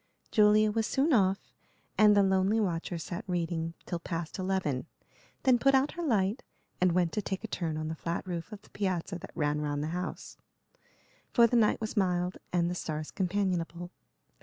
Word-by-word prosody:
Julia 215 0 +5
was 220 0 0
soon 285 +4 +2
off, 195 -4 +1 0.4
and 210 -1 +6
the 200 - +6
lonely 190 +3 +2
watcher 175 -3 -1
sat 170 +2 -5
reading 165 -2 -2
till 175 - -3
past 170 +1 -5
eleven; 185 -8 -1 0.6
then 255 -3 +4
put 275 +2 +4
out 270 +2 +3
her 345 - -6
light 220 - +1 0.4
and 180 -1 +4
went 175 -2 +2
to 210 - -1
take 190 +1 -4
a - - -3
turn 165 -6 -3
on 155 0 -3
the 160 - -3
flat 170 +3 -3
roof 175 +1 -5
of 210 -1 -9
the - - -21
piazza 185 -2 -2
that - - -10
ran 150 0 0
round 145 -1 -2
the 155 - -2
house, 180 +1 -5 0.9
for 235 - +5
the 235 - +1
night 220 -3 +3
was 220 0 -4
mild 180 -3 +1
and 175 -1 +2
the 175 - -1
stars 155 -3 -4
companionable. 180 -2 -1
185 Hz, 185 wpm, -30 LUFS, 170-210 Hz, 0.9 s, and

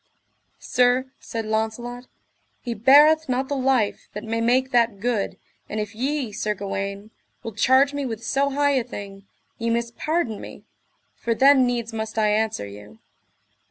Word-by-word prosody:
Sir, 250 +1 +1
said 225 -1 -5
Launcelot, 225 +3 -3 0.5
he 240 - -4
beareth 295 +7 +5
not 260 +1 -1
the 285 - -1
life 260 -5 0
that 210 - -6
may 225 +1 -2
make 255 +3 +2
that 235 -4 +2
good; 225 -2 -1 0.3
and 215 - -3
if 210 0 -4
ye, 265 +1 -2
Sir 210 +1 -2
Gawaine, 200 +1 -5 0.3
will 225 - -6
charge 260 +6 +4
me 285 0 -2
with 225 -1 -6
so 280 +1 +1
high 285 +1 +2
a - - -2
thing, 200 -4 -9 0.3
ye 230 0 -1
must 235 0 -1
pardon 305 -10 -1
me, - - -10 0.5
for 230 -1 -2
then 270 0 +5
needs 235 -2 -2
must 220 0 -5
I 215 -1 +3
answer 215 - 0
you. 105 +1 -12
230 Hz, 160 wpm, -23 LUFS, 215-260 Hz, 0.5 s, beareth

